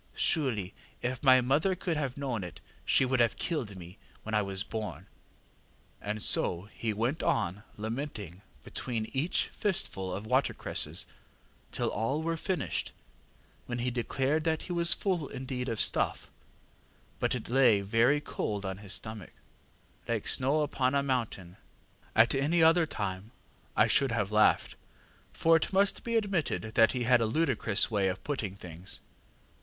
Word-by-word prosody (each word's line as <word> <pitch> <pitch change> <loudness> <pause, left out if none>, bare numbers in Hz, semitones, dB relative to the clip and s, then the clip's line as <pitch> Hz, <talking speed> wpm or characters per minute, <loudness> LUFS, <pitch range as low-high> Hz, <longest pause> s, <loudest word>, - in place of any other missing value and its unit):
Surely 110 - 0 0.3
if 125 0 -2
my 130 -2 +6
mother 150 +10 +2
could 175 -2 -2
have 140 -4 -3
known 130 -7 -2
it 90 - -8 0.3
she 135 - +3
would 130 0 0
have 120 -1 +3
killed 125 - -3
me 90 +1 -11 0.2
when 110 - -6
I 105 - +3
was 100 -1 -2
born! 110 -1 -5
ŌĆÖ - - -23 1.0
and 105 +1 -3
so 90 +4 +1
he 115 - -2
went 115 +8 -1
on 105 - 0 0.2
lamenting 110 - -5 0.2
between 115 -3 -4
each 140 +6 0
fistful 95 - -1
of 100 +4 -5
watercresses 130 +5 0 0.7
till - - -1
all 125 +9 -1
were 165 0 0
finished, 180 0 -2 0.7
when 120 - -3
he 125 +1 -1
declared 135 +5 0
that 160 -1 0
he 180 - -5
was 170 0 +3
full 180 -7 +3
indeed 130 -1 -4
of 115 -2 -3
stuff, - - +1 0.9
but - - +1
it 120 - -6
lay 120 -5 +4
very 115 +8 +3
cold 105 -8 -4
on 95 0 -4
his 105 -1 -3
stomach, 110 -6 -4 0.7
ŌĆślike - - -1
snow 140 +4 +3
upon 130 -2 0
a 140 - +2
mountain. 115 -9 -2
ŌĆÖ - - -33 0.2
At 115 - -3
any 150 +5 +2
other 165 0 +5
time 100 -4 -4 0.5
I - - +6
should 135 -3 +3
have 105 -3 -1
laughed, 105 0 +3 0.6
for 165 0 +3
it 160 - -2
must 195 +1 +2
be 230 -1 -2
admitted 185 - -1 0.2
he 125 -2 -2
had 120 0 +4
a 115 - +2
ludicrous 115 -6 +1
way 100 -3 +2
of 95 0 -3
putting 110 -10 -3
things. 90 -1 -6
125 Hz, 160 wpm, -30 LUFS, 105-150 Hz, 1.0 s, my